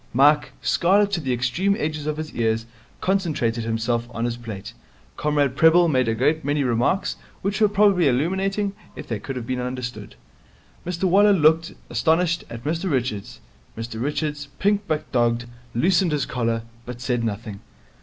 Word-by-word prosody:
Mike, 145 +4 +4
scarlet 200 +4 +3
to 175 -4 -1
the 135 -3 -2
extreme 125 +12 +1
edges 155 -1 -3
of 155 0 -1
his 155 0 -5
ears, 115 0 0 0.4
concentrated 155 -12 0
himself 115 +1 -1
on 115 0 -3
his 120 -1 -1
plate. 110 -5 -8 0.4
Comrade 145 -3 +1
Prebble 165 +3 +6
made 130 -6 +2
a 115 - +1
great 150 +7 +1
many 145 0 0
remarks, 125 - +1 0.3
which 200 +3 -1
were 210 - +5
probably 200 -5 +4
illuminating, 190 +9 0 0.2
if - - -8
they 115 -3 -3
could 135 - -6
have 125 -2 -4
been 130 +1 -2
understood. 125 0 -5 0.7
Mr 180 0 -3
Waller 200 +3 +5
looked, 160 -1 +3
astonished, 165 +1 +1
at 115 0 -8
Mr 165 +6 -1
Richards. 125 -8 -2 0.4
Mr 115 0 -5
Richards, 145 +1 -2
pink 205 0 +2
but 155 -1 -2
dogged, 120 -1 +1 0.3
loosened 175 +5 +3
his 145 -3 0
collar, 115 -2 -1 0.2
but 120 0 -8
said 125 -1 -1
nothing. 105 -2 -4
145 Hz, 165 wpm, -23 LUFS, 120-170 Hz, 0.7 s, Prebble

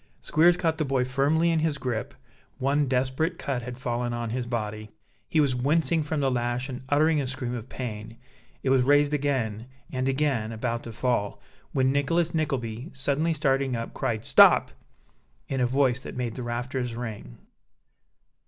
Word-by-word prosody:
Squeers 175 +3 +4
caught 165 -2 0
the - - +2
boy 135 -3 +1
firmly 145 +6 +2
in 165 - +2
his 155 -2 0
grip; 125 -5 -3 0.4
one 140 +2 +1
desperate 130 +6 0
cut 135 -3 -2
had 120 +1 -7
fallen 120 -1 -2
on 120 -1 -3
his 125 0 -3
body 110 -2 -4 0.4
he 160 - +2
was 140 -4 +3
wincing 155 +6 +1
from 150 0 -2
the 135 -1 +2
lash 120 +2 -1
and 125 -1 -6
uttering 150 +1 +3
a 135 - -3
scream 130 -2 -4
of 120 +1 -6
pain 115 -2 -6 0.5
it 130 - +1
was 135 -1 +5
raised 145 +3 +4
again, 125 -6 -1 0.2
and 130 +1 -1
again 135 -6 0
about 115 +1 -2
to 115 - -8
fall 115 -3 -1 0.3
when 130 -1 +2
Nicholas 165 +5 +1
Nickleby, 130 -4 -2
suddenly 140 +4 0
starting 135 -3 +1
up, 115 0 -5
cried 110 -1 -2
"Stop!" - - +6 0.8
in 135 -1 -1
a 125 - +3
voice 130 -1 +2
that 130 - -9
made 120 -3 -2
the 125 - -6
rafters 120 0 -3
ring. 110 - -7
130 Hz, 170 wpm, -26 LUFS, 120-145 Hz, 0.8 s, Stop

